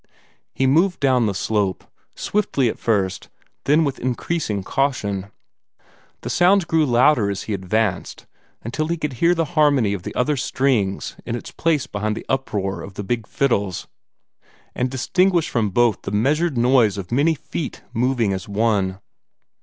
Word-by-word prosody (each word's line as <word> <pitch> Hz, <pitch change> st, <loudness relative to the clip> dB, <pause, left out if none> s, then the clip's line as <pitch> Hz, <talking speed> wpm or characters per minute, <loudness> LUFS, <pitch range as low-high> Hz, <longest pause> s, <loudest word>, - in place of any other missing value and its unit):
He 135 Hz, +3 st, +1 dB
moved 165 Hz, +8 st, +3 dB
down 130 Hz, -4 st, +3 dB
the 100 Hz, -, -2 dB
slope, 100 Hz, -2 st, -1 dB, 0.3 s
swiftly 145 Hz, -, 0 dB
at -, -, -6 dB
first, 100 Hz, -4 st, -1 dB, 0.4 s
then 150 Hz, +3 st, +4 dB
with 140 Hz, -3 st, -2 dB
increasing 125 Hz, -, -2 dB
caution. 105 Hz, -6 st, -1 dB, 0.9 s
The -, -, -5 dB
sounds 180 Hz, +2 st, +4 dB
grew 160 Hz, -2 st, +2 dB
louder 120 Hz, -3 st, +4 dB
as 100 Hz, -1 st, -3 dB
he 110 Hz, -, -4 dB
advanced, 100 Hz, +1 st, -2 dB, 0.4 s
until 145 Hz, +7 st, -2 dB
he 170 Hz, +1 st, -1 dB
could 150 Hz, -3 st, -3 dB
hear 175 Hz, +1 st, +4 dB
the 165 Hz, -1 st, 0 dB
harmony 145 Hz, -10 st, +3 dB
of 100 Hz, -, -4 dB
the -, -, -7 dB
other 140 Hz, +4 st, +1 dB
strings 125 Hz, -7 st, 0 dB
in 120 Hz, -, -3 dB
its 120 Hz, -, -7 dB
place 160 Hz, -4 st, 0 dB
beside 105 Hz, +1 st, -3 dB
the -, -, -7 dB
uproar 100 Hz, -9 st, -2 dB
of 95 Hz, +3 st, -10 dB
the 100 Hz, -, -5 dB
big 115 Hz, +1 st, -2 dB
fiddles, 100 Hz, -9 st, -1 dB, 0.9 s
and 125 Hz, +1 st, -1 dB
distinguish 175 Hz, +7 st, +1 dB
from 110 Hz, -4 st, 0 dB
both 115 Hz, +1 st, +2 dB
the -, -, -5 dB
measured 140 Hz, +8 st, +1 dB
noise 120 Hz, -4 st, +3 dB
of 95 Hz, -2 st, -7 dB
many 145 Hz, +6 st, +3 dB
feet 150 Hz, 0 st, -6 dB
moving 120 Hz, -3 st, +1 dB
as 95 Hz, +1 st, -5 dB
one. 100 Hz, -3 st, +1 dB
120 Hz, 160 wpm, -21 LUFS, 100-145 Hz, 0.9 s, then